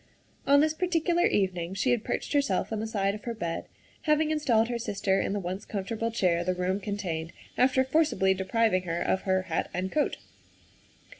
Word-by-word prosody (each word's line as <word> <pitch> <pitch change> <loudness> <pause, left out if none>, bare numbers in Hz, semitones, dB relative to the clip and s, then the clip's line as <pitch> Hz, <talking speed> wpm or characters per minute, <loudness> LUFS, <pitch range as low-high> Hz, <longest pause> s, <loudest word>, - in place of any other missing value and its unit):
On 285 +1 +6
this 310 0 +2
particular 345 0 +1
evening 185 -2 -1
she 250 +6 +1
had 240 -3 +1
perched - - -3
herself 275 -8 +1
on 220 - -2
the 220 - -3
side 200 -2 0
of 210 - -9
her 235 -1 -3
bed, 170 -6 -3 0.4
having 305 0 +3
installed 250 -8 +2
her 240 -1 -3
sister 195 -3 0
in - - -2
the 205 - -1
one 185 0 -4
comfortable 215 +3 -3
chair 180 -7 +1
the 185 +1 0
room 185 +2 -1
contained, 180 -6 -4 0.2
after 260 +1 +3
forcibly 265 -9 +2
depriving 190 +1 +1
her 170 0 -2
of 190 - 0
her 185 0 +2
hat 170 -3 -2
and 185 +1 -2
coat. 300 - 0
205 Hz, 190 wpm, -28 LUFS, 185-260 Hz, 0.4 s, On